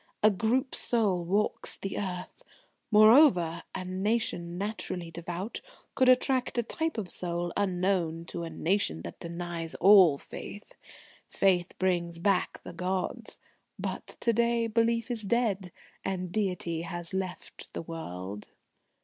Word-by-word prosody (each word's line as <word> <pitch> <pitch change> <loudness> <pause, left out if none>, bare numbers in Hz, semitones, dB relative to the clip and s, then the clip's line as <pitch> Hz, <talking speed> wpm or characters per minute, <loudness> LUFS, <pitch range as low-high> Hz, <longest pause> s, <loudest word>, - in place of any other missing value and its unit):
A 215 - +7
Group 235 +6 0
soul 205 -7 +1
walks 200 +5 +1
the 195 - -4
earth. 185 - -5 0.5
Moreover, 210 - +6
a 185 -1 -4
nation 185 -2 -1
naturally 185 -4 -4
devout 175 +5 -5 0.3
could 260 -1 +4
attract 255 0 +3
a 240 - +2
type 320 +5 -2
of 210 -4 -2
soul 175 -1 -3
unknown 180 -4 0
to 170 - -5
a 165 - -4
nation 160 - 0
that 85 - -8
denies 170 -1 -5
all 185 -6 +7
faith. 205 +8 -9 0.6
Faith 180 -2 +1
brings 175 -2 0
back 190 +2 0
the - - -8
gods.... 185 +2 -3 0.4
But - - -5
to 235 - +2
day 235 0 +2
belief 230 +2 +1
is 235 -2 0
dead, 200 -4 0 0.3
and 185 -2 -3
Deity 180 -5 -1
has 175 0 -2
left 190 -1 -5
the - - -4
world." 105 - -7
185 Hz, 130 wpm, -29 LUFS, 170-215 Hz, 0.6 s, A